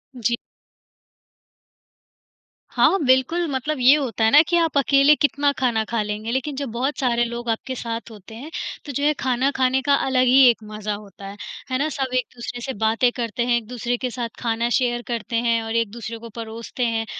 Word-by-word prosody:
जी। 240 -1 0 2.4
हाँ, 390 - +4
बिल्कुल, 260 +7 +3
मतलब 280 +3 -2
ये 255 +3 +7
होता 255 -6 -2
है 220 - +4
ना 295 - +9
कि 345 - +3
आप 330 -3 +1
अकेले 275 +1 +5
कितना 285 -1 +1
खाना 235 -4 +1
खा 230 -2 0
लेंगे, 210 +2 -4
लेकिन 265 +3 -2
जब 275 -1 -4
बहुत 260 +5 -2
सारे 240 -3 +2
लोग 235 0 -5
आपके 230 +3 -2
साथ 230 -2 -5
होते 215 0 -12
हैं, 270 +7 -9 0.4
तो 290 - -5
जो 285 +2 -3
है, 300 +1 +4
खाना 260 +1 +1
खाने 260 0 +2
का 285 +1 +3
अलग 260 -1 +2
ही 255 +2 +6
एक 230 -2 0
मज़ा 210 0 -5
होता 200 -1 -10
है, 200 +1 -9 0.3
है 255 - +1
ना? 305 +2 0
सब 270 -4 -3
एक-दूसरे 245 -1 -5
से 265 +2 -4
बातें 225 +3 +2
करते 235 0 -2
हैं, 240 -1 +2
एक-दूसरे 240 +1 -3
के 255 +1 -3
साथ 235 -1 -4
खाना 230 0 -1
शेयर 240 -1 0
करते 235 -1 -4
हैं, 230 0 +2
और 225 0 -4
एक-दूसरे 230 0 -2
को 230 0 -10
परोसते 230 +2 -4
हैं। 225 -1 -1
240 Hz, 195 wpm, -22 LUFS, 230-265 Hz, 2.4 s, ना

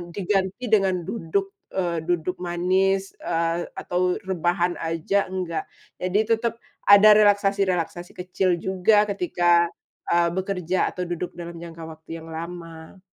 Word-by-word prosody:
diganti 195 +3 -1
dengan 190 -4 +3
duduk, 195 -1 -2 0.2
eee, 175 -3 0
duduk 175 +1 -1
manis, 185 +2 +1
eee, 165 +1 -1
atau 180 0 0
rebahan 175 -1 0
aja, 165 +5 0
enggak, 180 -3 -3 0.4
jadi 185 +3 +1 0.2
tetep 230 0 -2 0.3
ada 205 +1 +9
relaksasi-relaksasi 195 -4 +2
kecil 180 -1 -1
juga 190 +3 +3
ketika, 175 -3 +2 0.4
eee, 170 0 +4
bekerja 185 -2 -1
atau 180 -1 -4
duduk 175 +1 -4
dalam 170 0 -8
jangka 170 0 -10
waktu 160 +1 -9
yang 160 - -12
lama. 165 +1 -8
180 Hz, 125 wpm, -24 LUFS, 170-195 Hz, 0.4 s, ada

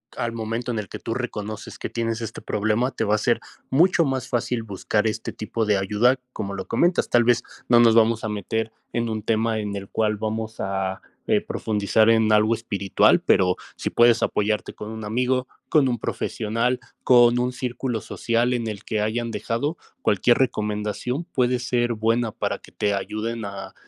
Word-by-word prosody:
al 120 - -2
momento 115 +2 -3
en 115 - -2
el 105 - -5
que - - -8
tú 115 - -3
reconoces 110 -3 -5
que - - -5
tienes 115 0 -2
este 110 -1 -5
problema, 110 +5 0
te - - -2
va 105 -1 +2
a - - +2
ser 120 +2 +1 0.3
mucho 170 +4 +4
más 135 -3 -2
fácil 120 -1 -1
buscar 105 +1 -1
este 110 0 -2
tipo 110 +1 -2
de 105 -1 +3
ayuda, 105 +7 +2
como 100 -5 -5
lo 95 -1 -5
comentas. 175 +1 +1
Tal 120 -1 +4
vez 120 0 +3 0.2
no 120 -1 +6
nos 115 -1 +6
vamos 115 0 +3
a 110 - -2
meter 110 +2 -2 0.2
en 115 -1 -1
un 110 -1 -3
tema 110 +1 0
en 105 -1 -3
el 100 -1 -6
cual 110 -1 +1
vamos 110 +1 -4
a, 95 -1 -2 0.3
eh, - - +3
profundizar 110 +1 +1
en 110 -1 +4
algo 110 +2 +4
espiritual. 100 -4 +2
Pero 90 -1 +3 0.2
si - - -3
puedes 120 -1 +4
apoyarte 105 -2 0
con 105 - -8
un 110 0 -7
amigo, 125 +4 0 0.2
con 145 -5 +3
un 120 -3 -1
profesional, 115 +4 -1 0.2
con 120 -1 +6
un 125 +1 +1
círculo 125 -1 -3
social 120 +4 0
en 120 -2 -2
el 105 -2 -6
que 110 -1 -1
hayan 115 +2 -1
dejado 115 +8 -2 0.2
cualquier 110 +4 +3
recomendación, 105 +4 -1
puede 125 -4 +1
ser 120 -1 0
buena 115 +1 +1
para - - -3
que - - -17
te 105 -1 0
ayuden 110 +3 -3
a 100 -1 -7
115 Hz, 190 wpm, -24 LUFS, 105-120 Hz, 0.3 s, no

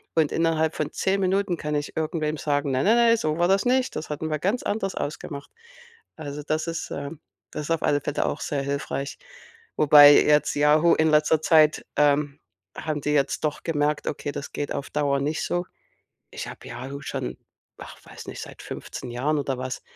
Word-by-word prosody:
und 155 -3 +2
innerhalb 160 -1 +1
von 150 -1 -2
10 195 +1 0
Minuten 190 -1 +1
kann 150 -1 -4
ich 145 +1 -4
irgendwem 155 -1 -1
sagen: 145 -1 -1
„Nein, 130 +1 0
nein, 225 +3 +5
nein, 235 -1 +5
so 155 -6 -1
war 175 - +3
das 195 +3 +3
nicht, 255 +1 +1
das 155 - -6
hatten 155 +1 -4
wir 155 -1 -1
ganz 205 +10 -1
anders 200 -2 -2
ausgemacht.“ 145 -1 -5 0.7
Also, 150 -1 -6
das 155 +2 -2
ist 165 -1 -4
ähm, 140 +2 -6 0.3
das 150 - -5
ist 165 - -4
auf 165 - 0
alle 145 0 +2
Fälle 145 +1 -1
auch - - -3
sehr 140 -2 -2
hilfreich. 140 0 -3 0.6
Wobei 145 -1 +9
jetzt 150 0 +4
Yahoo 150 +3 +4
in 160 0 +2
letzter 150 +1 +4
Zeit, 155 -2 +4
ähm, 145 -1 +2 0.4
haben 155 -2 -3
die 150 - -1
jetzt 140 -2 0
doch 150 - -3
gemerkt: 150 -2 0
„Okay, 145 0 -3
das 140 - -6
geht 145 - -4
auf 140 0 -5
Dauer 145 -2 +1
nicht 150 +2 -1
so.“ 175 0 -1 0.7
Ich - - -6
habe - - -10
Yahoo 130 +4 -7
schon, 65 - -4 0.4
ach - - -11
weiß - - -11
nicht, - - -7
seit - - -10
15 125 - -7
Jahren 140 +6 0
oder 135 -2 -2
was 130 0 -5
150 Hz, 195 wpm, -25 LUFS, 145-160 Hz, 0.7 s, Wobei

